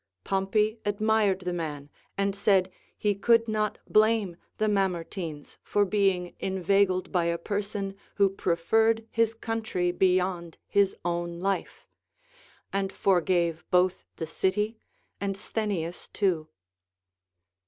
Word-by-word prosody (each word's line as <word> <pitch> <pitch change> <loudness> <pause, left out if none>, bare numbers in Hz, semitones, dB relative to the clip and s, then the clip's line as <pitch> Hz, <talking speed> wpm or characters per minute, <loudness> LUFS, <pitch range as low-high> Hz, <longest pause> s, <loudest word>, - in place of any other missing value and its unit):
Pompey 210 +3 +1
admired 205 -1 +2
the 180 -1 -3
man, 150 -4 -4 0.3
and 200 0 0
said, 195 -2 +3 0.3
he 210 -1 +1
could 230 +3 +3
not 215 -1 0
blame 215 -4 +3 0.2
the 215 - +1
Mamertines 180 -5 -2
for 205 0 +1
being 190 -3 +1
inveigled 190 0 +1
by 175 -3 +2
a 170 0 +1
person 200 +1 -3 0.2
who 200 -1 +5
preferred 220 +5 +1
his 230 0 +1
country 220 -6 -1
beyond 180 -2 +1
his 200 -1 +2
οΛΛ^η 170 0 -2
life; 195 +1 -2 0.9
and 195 -1 0
forgave 175 -4 +1
both 180 0 +2
the 165 - -4
city 210 +7 0 0.4
and 195 -1 -2
Sthenius 195 -5 -3
too. 175 -7 0
195 Hz, 115 wpm, -27 LUFS, 175-210 Hz, 0.9 s, who